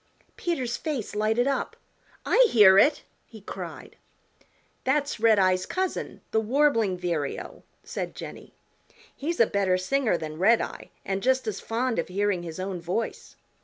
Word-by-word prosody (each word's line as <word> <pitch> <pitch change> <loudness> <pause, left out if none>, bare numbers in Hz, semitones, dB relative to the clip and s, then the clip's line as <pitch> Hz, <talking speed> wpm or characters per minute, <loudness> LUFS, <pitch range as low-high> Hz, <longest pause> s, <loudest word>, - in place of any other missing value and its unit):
Peter's 260 -9 -2
face 280 -11 -4
lighted 220 +3 +1
up. 275 0 -1 0.5
"I - - +5
hear 195 - +7
it," 290 +7 +3 0.2
he 220 - -12
cried. 200 - -8 0.9
"That's 285 -1 0
Redeye's 190 -5 +3
cousin, 375 -1 -3
the 220 - +2
Warbling 230 -5 +2
Vireo," 170 -5 -3 0.2
said - - -5
Jenny. - - -10 0.6
"He's 330 +4 -3
a 230 - +7
better 195 -3 +1
singer 220 +2 +1
than 155 -1 -7
Redeye 220 +5 +2 0.2
and 195 0 -2
just 260 +2 +2
as 215 -3 -3
fond 235 -1 -1
of - - -2
hearing 200 -1 0
his 165 0 -7
own 185 -2 -4
voice. 180 +7 -4
215 Hz, 140 wpm, -26 LUFS, 185-260 Hz, 0.9 s, hear